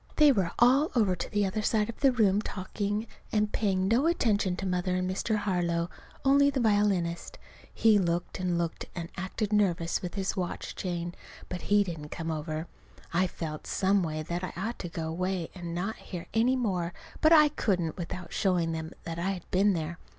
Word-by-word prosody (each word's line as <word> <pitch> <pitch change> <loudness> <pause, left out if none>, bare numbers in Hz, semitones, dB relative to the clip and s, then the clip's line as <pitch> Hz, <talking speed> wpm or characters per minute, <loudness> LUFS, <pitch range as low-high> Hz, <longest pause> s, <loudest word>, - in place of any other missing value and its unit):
They 300 -2 +7
were 195 -9 +1
all 265 +6 +5
over 205 -6 +3
to 170 - -5
the 205 -1 +1
other 200 +3 -1
side 215 -1 +1
of 230 - -7
the 275 -2 +5
room 210 -4 +3
talking, 205 +2 -3 0.3
and 210 -1 +1
paying 190 -3 +1
no 240 +9 +3
attention 210 - +2
to 195 - -4
Mother 180 0 0
and 185 0 0
Mr. 190 +4 0
Harlow, 175 -4 0 0.3
only 280 +1 +6
the 275 -1 -1
violinist. 205 -6 +1 0.3
He 220 -2 +4
looked 175 0 -1
and 180 -2 0
looked, 170 -1 -2
and 170 -2 -5
acted 195 +3 -3
nervous 175 -5 +2
with 180 +1 -5
his 195 -1 -1
watch 180 -2 -4
chain. 175 -2 -3 0.4
But 180 - -4
he 205 0 +5
didn't 165 -5 -6
come 165 +1 -4
over. 155 +1 -3 0.5
I 180 +2 +3
felt, 155 -3 -6
some 195 +1 +2
way, 155 -2 -2
that 175 +3 -3
I 185 - -4
ought 225 +6 -3
to 175 - -5
go 165 -1 -4
away 180 +1 -2
and 175 -2 -6
not 195 +6 -2
hear 175 -3 -7
any 235 +3 +3
more; 185 -8 -1 0.3
but 310 - +5
I 305 -2 +8
couldn't 180 - 0
without 175 0 -6
showing 180 -4 +1
them 160 +1 -4
that 165 0 -5
I 180 +3 0
had 180 -3 -8
been 200 +2 +4
there. 165 0 -3
185 Hz, 195 wpm, -29 LUFS, 170-210 Hz, 0.5 s, I